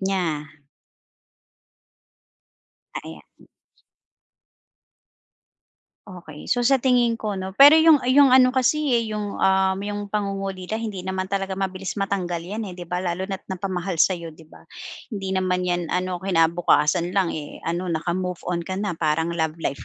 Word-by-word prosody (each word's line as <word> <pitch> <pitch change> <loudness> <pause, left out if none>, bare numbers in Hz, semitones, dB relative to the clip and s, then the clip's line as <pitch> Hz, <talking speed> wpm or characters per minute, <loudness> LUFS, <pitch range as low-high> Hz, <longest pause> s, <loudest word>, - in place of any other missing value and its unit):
niya. 175 -6 -2 2.5
Ah, - - -3
ayan. 80 -2 -10 2.8
Okey. 170 -6 -11
So 245 -1 +1
sa 270 +3 +4
tingin 240 -3 +2
ko, 210 -2 -3
'no. 190 0 -5
Pero 285 +3 +10
'yong, 320 -1 +6
ah, 245 - -7
'yong 275 +1 +6
ano, 255 0 +7
kasi, 260 +4 +2 0.2
eh, 230 - 0
'yong, 210 -1 -4
um, 190 0 +3
'yong 205 0 -4
pangungulila 195 -1 -3
hindi 215 -5 -5
naman 190 0 -3
talaga 195 -1 -3
mabilis 190 +1 -4
matanggal 190 -3 -2
'yan, 205 +6 -5
eh, - - -9
'di 175 -1 -8
ba? 180 +1 -2
Lalo 180 +1 -2
na't 195 -1 -5
napamahal 185 -1 -3
sa 185 +4 +4
'yo, 170 -1 -8
'di 160 +1 -17
ba? - - -17 0.5
Hindi 195 -2 -3
naman 185 -1 0
'yan, 175 0 0
ano, 180 0 -1
kinabukasan 170 -2 +2
lang, 190 -3 +1
eh, 150 -2 -7
ano, 175 +2 -2
naka-move 175 +2 -2
on 170 -1 -1
ka 185 +2 -4
na 205 -3 -2
parang 160 +1 0
love 160 -1 -1
life 140 - -3
190 Hz, 155 wpm, -23 LUFS, 175-205 Hz, 2.8 s, Pero